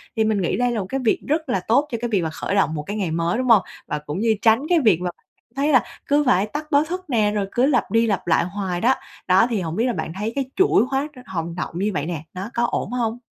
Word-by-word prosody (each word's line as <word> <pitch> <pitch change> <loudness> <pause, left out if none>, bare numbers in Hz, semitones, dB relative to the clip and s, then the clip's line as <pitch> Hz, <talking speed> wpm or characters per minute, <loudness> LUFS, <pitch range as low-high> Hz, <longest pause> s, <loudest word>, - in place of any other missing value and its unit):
Thì 220 - +2
mình 215 -2 +1
nghĩ 175 - 0
đây 245 0 +1
là 230 - -1
một 195 - -3
cái 270 - -1
việc 220 - +3
rất 310 0 -1
là 195 - +1
tốt 280 +7 +3
cho 235 - -1
cái 240 - -2
việc 200 -5 +1
mà 160 - -1
khởi 175 +5 -3
động 175 -6 +2
một 150 - -4
cái 205 +7 -5
ngày 190 -6 -1
mới, 170 +5 0
đúng 255 - -1
hông? 225 -4 +7 0.3
Và 150 - -2
cũng 150 +4 -5
như 225 0 +2
tránh 225 +2 +4
cái 350 -2 +4
việc 210 - +3
mà 180 - -1 0.5
thấy 285 +3 +1
là 250 -5 +6 0.2
cứ 290 +1 +3
phải 205 -6 +3
tắt 300 +8 -6
báo 285 0 +5
thức 365 +3 -5
nè, 215 -5 +2
rồi 205 -1 -1
cứ 245 - +2
lặp 270 -4 +1
đi 230 +1 +3
lặp 200 -5 -1
lại 165 - +3
hoài 185 -1 -3
đó. 255 +3 +4 0.3
Đó, 190 +5 +5
thì 220 -5 -1
hổng 165 -2 -4
biết 230 - +1
là 250 - 0
bạn - - -4
thấy 210 +3 -2
cái 275 -1 0
chuỗi 380 - +4
hóa 270 +2 0 0.2
hồng 170 -2 -4
động 175 - -4
như 200 +3 0
vậy 145 -3 -2
nè, 160 -3 -4
nó 190 +4 -5
có 235 - 0
ổn - - -2
hông? 240 -1 -1
220 Hz, 290 wpm, -22 LUFS, 185-250 Hz, 0.5 s, hông